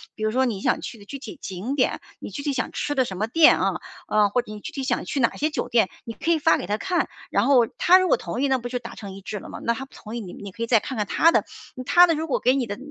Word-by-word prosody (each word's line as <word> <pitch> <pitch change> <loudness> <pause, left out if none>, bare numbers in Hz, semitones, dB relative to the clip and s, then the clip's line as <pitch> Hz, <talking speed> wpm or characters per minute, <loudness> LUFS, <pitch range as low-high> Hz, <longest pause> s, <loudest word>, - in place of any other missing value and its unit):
比 215 - -6
如 215 - +1
说 260 +2 +2
你 225 -6 -2
想 - - 0
去 - - -7
的 205 - -15
具 275 - -7
体 305 +4 -9
景 195 +8 -4
点， 265 - +1 0.2
你 - - -7
具 280 - -6
体 290 - 0
想 275 - -2
吃 290 - -2
的 260 - +4
什 190 - -6
么 210 +4 -1
店 320 +7 +6
啊， - - 0 0.3
啊， 210 -1 +3
或 245 +5 +1
者 215 - -12
你 210 - -7
具 - - -7
体 275 - -4
想 260 - -1
去 280 - -2
哪 235 - +2
些 305 +2 0
酒 - - -3
店， 225 -5 +3 0.2
你 230 - -7
可 330 +4 -1
以 325 - +3
发 325 +2 +4
给 - - -5
她 205 +3 -1
看， 365 -2 0 0.2
然 - - +2
后 250 -5 +5
她 370 +2 +6
如 370 - +1
果 - - +3
同 245 - -4
意 280 - +2
那 265 -1 +2
不 245 -1 -6
就 250 0 -2
达 235 -1 -9
成 200 -3 -8
一 195 - -10
致 210 +2 -5
了 - - -11
吗， - - -8
那 235 - +2
她 265 - -6
不 270 - -24
同 225 +2 -8
意， - - -3
你 190 -6 -8
你 200 -1 -9
可 230 +5 -5
以 230 - -2
再 230 -2 +5
看 260 +3 -6
看 210 - 0
她 330 +9 +4
的 - - +2 0.4
她 355 +6 +7
的 330 - +2
如 315 +1 -2
果 280 - 0
给 255 +2 +3
你 265 - 0
的 205 - -5
245 Hz, 360 characters per minute, -24 LUFS, 215-285 Hz, 0.4 s, 她